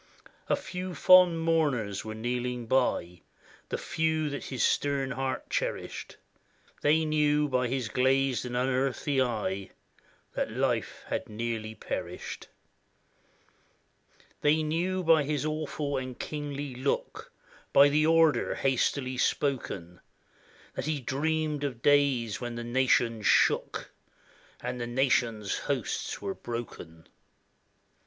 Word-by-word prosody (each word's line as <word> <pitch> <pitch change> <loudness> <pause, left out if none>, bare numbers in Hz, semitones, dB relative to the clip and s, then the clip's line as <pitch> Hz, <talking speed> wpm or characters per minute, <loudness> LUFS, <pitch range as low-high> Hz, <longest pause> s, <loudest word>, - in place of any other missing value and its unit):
A - - +4
few 180 -1 -6
fond 180 -3 +6
mourners 140 -12 +1
were 110 0 -6
kneeling 120 +1 -2
by, 110 -8 0 0.5
The - - -1
few 160 -2 0
that 140 - -5
his 130 -4 -2
stern 140 -2 +1
heart 130 -2 -3
cherished; - - -3 0.6
They 155 +2 +3
knew 150 -1 +2
by 125 -2 +1
his 125 -1 -2
glazed 130 +2 +2
and 125 -1 -3
unearthly 135 +2 +1
eye 105 -6 -2 0.6
That - - -1
life - - -1
had - - -3
nearly 110 0 -4
perished. - - -6 1.9
They 155 +1 +3
knew 175 +4 -1
by 165 -2 +5
his 145 0 -1
awful 155 -2 -2
and 130 -1 -5
kingly 145 -2 -5
look, 130 +3 -3 0.4
By 140 +1 +7
the 150 +2 +3
order 165 -1 +4
hastily 130 -1 0
spoken, 95 - -1 0.7
That - - -4
he 155 -1 -1
dreamed 150 +3 -1
of 125 -5 -4
days 140 -7 +3
when 120 -1 -4
the 120 - -4
nations 120 -3 +2
shook, - - +2 0.7
And 125 0 -4
the 120 - -3
nations' 120 -4 +1
hosts - - -2
were 100 -1 -2
broken. 100 -9 -7
135 Hz, 120 wpm, -29 LUFS, 120-150 Hz, 1.9 s, By